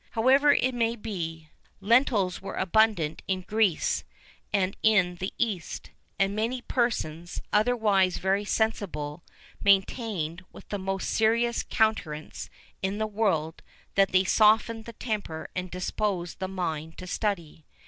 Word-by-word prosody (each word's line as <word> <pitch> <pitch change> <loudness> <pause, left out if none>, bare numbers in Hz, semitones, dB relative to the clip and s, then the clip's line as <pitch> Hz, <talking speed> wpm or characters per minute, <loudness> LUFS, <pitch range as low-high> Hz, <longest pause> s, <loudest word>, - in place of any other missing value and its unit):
However 270 +5 +5
it 260 0 +1
may 230 -1 +1
be, 165 -8 -5 0.3
lentils 205 -4 +2
were 195 - -6
abundant 185 -5 +2
in 185 -1 0
Greece 205 -3 +1 0.5
and 195 -2 +1
in 190 -5 +3
the 190 +2 -3
East; 210 -8 -3 0.3
and 195 +1 +1
many 235 +4 -1
persons, 175 - -1
otherwise 210 -5 +3
very 195 +2 +1
sensible, 180 -8 -2 0.4
maintained, 190 -4 +1
with - - -13
the 205 - -3
most 195 0 -2
serious 235 +2 +2
countenance 160 -9 -1 0.3
in 195 +2 -1
the 215 - 0
world, 195 -7 -1 0.3
that 195 -1 +3
they 185 0 +4
softened 220 +3 +3
the 235 - -8
temper 210 -9 -4
and 185 0 -3
disposed 180 0 -2
the 190 - -2
mind 160 -4 -4
to 185 - -7
study. 175 -6 -3
195 Hz, 130 wpm, -27 LUFS, 180-220 Hz, 0.5 s, However